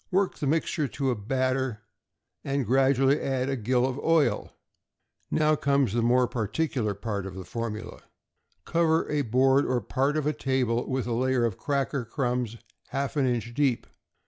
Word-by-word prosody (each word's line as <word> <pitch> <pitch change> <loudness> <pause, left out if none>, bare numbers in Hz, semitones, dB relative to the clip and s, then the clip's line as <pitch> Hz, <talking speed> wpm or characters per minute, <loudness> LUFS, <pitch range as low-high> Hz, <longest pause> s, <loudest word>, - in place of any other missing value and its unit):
Work 190 +1 0
the 145 - -1
mixture 155 0 0
to 135 0 -1
a - - 0
batter, 130 +1 -1 0.6
and 140 -1 -1
gradually 135 +3 +3
add 130 -1 -1
a 135 - 0
gill 125 +1 +1
of 130 +1 -2
oil. 165 -2 +1 0.7
Now 155 0 +3
comes 140 -6 +1
the 120 - +1
more 125 +2 +3
particular 120 -1 -1
part 100 -1 -4
of 95 - -8
the 95 -1 -7
formula. 115 -2 -5 0.6
Cover 165 -1 +2
a 150 -1 +1
board 135 +3 +3
or 125 -1 0
part 135 +7 0
of 150 - -1
a 150 - +1
table 125 -4 0
with 130 -1 -1
a 120 - -2
layer 130 0 +1
of 110 -5 -3
cracker 140 -2 -1
crumbs 120 -1 -2 0.3
half 140 +2 -3
an 140 -3 +2
inch 120 -1 -2
deep. 135 -2 +1
130 Hz, 170 wpm, -27 LUFS, 120-140 Hz, 0.7 s, gradually